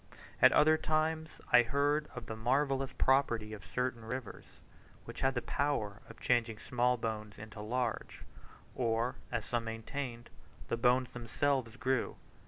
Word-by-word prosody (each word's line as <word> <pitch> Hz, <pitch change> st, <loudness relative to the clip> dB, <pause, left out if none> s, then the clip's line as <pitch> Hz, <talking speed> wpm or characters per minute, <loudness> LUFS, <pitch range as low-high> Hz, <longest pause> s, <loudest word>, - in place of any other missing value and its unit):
At -, -, +9 dB
other 155 Hz, +1 st, +5 dB
times 160 Hz, 0 st, 0 dB, 0.2 s
I 120 Hz, -, +10 dB
heard 145 Hz, +5 st, +1 dB
of 125 Hz, -2 st, -6 dB
the 110 Hz, -, -5 dB
marvellous 135 Hz, +3 st, +1 dB
property 120 Hz, -5 st, +2 dB
of 105 Hz, -3 st, -8 dB
certain 120 Hz, +7 st, -2 dB
rivers, 125 Hz, 0 st, -6 dB, 0.6 s
which -, -, -8 dB
had 135 Hz, 0 st, +2 dB
the 125 Hz, -, -1 dB
power 115 Hz, -8 st, -1 dB
of -, -, -12 dB
changing 120 Hz, -3 st, +1 dB
small 125 Hz, +2 st, +1 dB
bones 110 Hz, -2 st, -4 dB
into 105 Hz, 0 st, -9 dB
large; 120 Hz, +2 st, -2 dB, 0.5 s
or, 115 Hz, 0 st, 0 dB
as -, -, -2 dB
some 120 Hz, -1 st, -1 dB
maintained, 120 Hz, +2 st, -5 dB, 0.4 s
the -, -, +1 dB
bones 125 Hz, +1 st, +3 dB
themselves 125 Hz, 0 st, -1 dB
grew. 130 Hz, -1 st, 0 dB
125 Hz, 145 wpm, -33 LUFS, 115-135 Hz, 0.6 s, I